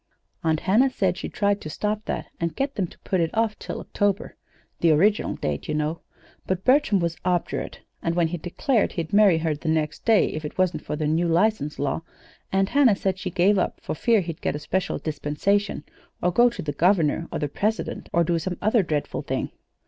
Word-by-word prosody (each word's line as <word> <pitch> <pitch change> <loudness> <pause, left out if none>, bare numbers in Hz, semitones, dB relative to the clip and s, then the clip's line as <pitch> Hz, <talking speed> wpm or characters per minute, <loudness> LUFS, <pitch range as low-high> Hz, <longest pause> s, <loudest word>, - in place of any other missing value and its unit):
"Aunt 160 -1 +1
Hannah 225 +8 +4
said 190 -8 0
she - - -5
tried 205 0 0
to 155 - -6
stop 210 +6 -2
that, - - -3
and 170 -1 -2
get 275 +1 -1
them 195 -7 -1
to - - -17
put 190 - -1
it 165 - +1
off 225 -1 +1
till - - -5
October 200 -1 -1 0.4
(the 170 - +3
original 195 +8 +3
date, 75 -1 -3
you - - -1
know), 155 +2 -1 0.5
but 185 0 -2
Bertram 260 -6 +4
was 170 -1 -1
obdurate. 180 -1 -2 0.2
And 165 0 -1
when 170 -2 +2
he 175 0 -4
declared 215 - 0
he'd 170 +2 -4
marry 200 -5 +6
her 160 -1 0
the 150 +2 -4
next 155 -1 -1
day 225 -2 +5
if 155 - -5
it 150 - -6
wasn't 185 -1 +1
for - - -3
the 155 0 -2
new 160 +3 +1
license 170 -3 +1
law, 145 +3 -1 0.5
Aunt 195 0 +2
Hannah 275 -7 +5
said 190 -1 -1
she 185 - -3
gave 190 +2 +3
up - - -1
for - - -4
fear 220 +7 +3
he'd 165 -3 -6
get - - -1
a - - -3
special 185 +5 -1
dispensation, 155 +5 -1 0.4
or 180 - +1
go 240 +7 +5
to 235 - -7
the 145 -2 -3
Governor 165 0 +2
or - - -2
the 150 - -1
President, 215 +9 -2
or 170 - +3
do 170 0 +1
some 180 +1 -4
other 215 +2 +3
dreadful 155 -5 -2
thing. - - -3
180 Hz, 215 wpm, -24 LUFS, 160-205 Hz, 0.5 s, marry